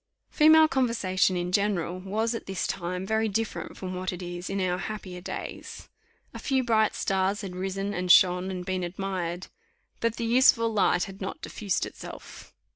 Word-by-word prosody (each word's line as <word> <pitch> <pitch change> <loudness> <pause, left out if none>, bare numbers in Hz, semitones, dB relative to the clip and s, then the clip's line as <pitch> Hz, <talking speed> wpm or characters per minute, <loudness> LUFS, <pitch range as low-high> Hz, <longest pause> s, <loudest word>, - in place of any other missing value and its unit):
Female 315 0 +7
conversation 225 - +1
in 175 0 -2
general 185 -3 0
was, 215 +5 -1
at 230 - -6
this 190 -1 -2
time, 180 0 -3
very 220 +2 +1
different 220 +2 -3
from 185 -1 -5
what 185 0 -3
it 180 0 -7
is 175 0 -6
in 195 0 -2
our 180 -1 0
happier 190 -4 -6
days. - - -7 0.4
A - - -7
few 265 -2 +1
bright 220 -3 +2
stars 195 +1 0
had 190 -3 -6
risen, 195 +2 -3
and 180 -1 +1
shone, 180 +1 +5
and 180 -1 -5
been 185 -1 -2
admired; 180 -1 -3 0.5
but 230 -1 0
the 230 - -3
useful 230 -1 +4
light 185 -3 +3
had 195 +1 -8
not 195 - -5
diffused 200 -4 -2
itself. - - -10
195 Hz, 175 wpm, -27 LUFS, 180-220 Hz, 0.5 s, Female